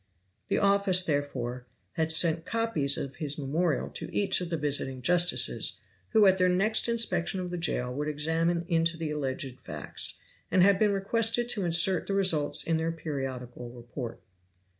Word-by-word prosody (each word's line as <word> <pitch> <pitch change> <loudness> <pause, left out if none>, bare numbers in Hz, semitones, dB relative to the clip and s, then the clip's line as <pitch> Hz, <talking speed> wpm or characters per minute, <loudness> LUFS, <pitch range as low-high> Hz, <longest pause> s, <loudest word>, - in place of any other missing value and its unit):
The - - 0
office, 200 -2 +3
therefore, 130 -6 -3 0.2
had 160 0 -1
sent 160 0 +3
copies 185 -9 0
of 135 -2 -6
his 145 -2 -4
memorial 150 +2 -1
to - - -7
each 195 -2 +1
of 175 - -4
the 165 - -2
visiting 135 -3 -1
justices, 175 +3 +2 0.3
who 220 -2 +4
at 190 -1 +4
their 185 0 +4
next 210 +6 +2
inspection 190 -6 0
of 180 -1 -5
the 175 - -3
jail 125 -7 -2
would 145 +3 -3
examine 165 +3 -1
into 165 0 +1
the 160 -2 -4
alleged 135 -3 -4
facts, - - -5 0.3
and 185 - +4
had 195 0 +4
been 210 -1 +3
requested 230 +4 +1
to 205 -6 0
insert 170 +2 +3
the 195 - -1
results 170 -7 +2
in 165 -1 0
their 160 +1 -1
periodical 130 -6 -6
report. 120 0 -8
165 Hz, 165 wpm, -28 LUFS, 145-190 Hz, 0.3 s, who